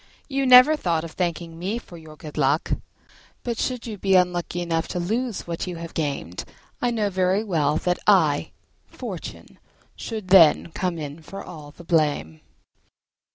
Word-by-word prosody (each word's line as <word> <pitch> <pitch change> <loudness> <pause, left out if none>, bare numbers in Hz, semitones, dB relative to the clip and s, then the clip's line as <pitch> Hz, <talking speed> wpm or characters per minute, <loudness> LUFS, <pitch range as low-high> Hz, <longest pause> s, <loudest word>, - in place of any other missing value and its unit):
You 275 -1 0
never 255 +5 +9
thought 170 - -1
of 165 - -7
thanking 170 -1 -3
me 195 +6 -2
for 210 -7 -11
your 160 -2 -12
good 150 0 -10
luck; 145 +1 +1 0.7
but 235 -2 -3
should 250 -2 -2
you 215 -4 -6
be 195 0 +2
unlucky 180 -1 +1
enough 165 -1 -1
to 180 - -3
lose 225 +5 -2
what 170 +2 -4
you 180 - -4
have 165 0 -8
gained 140 - -3 0.4
I 245 - +2
know 215 -4 0
very 190 +2 +1
well 155 -7 +1
that 180 +1 0
I, 160 -8 +4 0.4
Fortune, - - -8 0.4
should 215 -5 -6
then 170 -3 +6
come 180 -1 -2
in 150 0 -7
for 195 +5 -9
all 150 -4 -10
the 165 +4 -14
blame." 150 - 0
175 Hz, 165 wpm, -24 LUFS, 160-200 Hz, 0.7 s, never